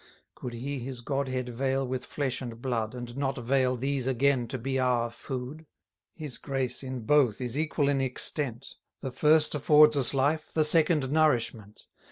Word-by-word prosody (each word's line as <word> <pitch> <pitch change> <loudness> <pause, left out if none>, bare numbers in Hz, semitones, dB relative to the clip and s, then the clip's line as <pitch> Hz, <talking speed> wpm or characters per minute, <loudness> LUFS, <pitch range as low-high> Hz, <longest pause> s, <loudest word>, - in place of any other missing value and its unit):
Could 125 - -7
he 135 +4 -4
his 125 0 -6
Godhead 130 -1 -2
veil 135 +2 -1
with 130 0 -4
flesh 135 -3 -3
and 115 -3 -7
blood, 120 -2 -2
And 120 -1 -7
not 135 -1 -2
veil 130 +1 +1
these 135 +1 -1
again 130 -1 +2
to 130 - -4
be 130 +2 -2
our 120 -2 +1
food? 135 +6 -7 0.5
His 150 -6 -5
grace 135 -3 -2
in 130 -2 -5
both 125 -2 +3
is 125 -1 -3
equal 150 -1 0
in 140 -1 +1
extent, 130 -1 -2 0.2
The 135 - -4
first 150 +4 +3
affords 150 +1 +5
us 135 -1 +3
life, 145 +4 0
the 155 - +2
second 155 -3 +2
nourishment. 120 -9 0
130 Hz, 170 wpm, -28 LUFS, 125-145 Hz, 0.5 s, affords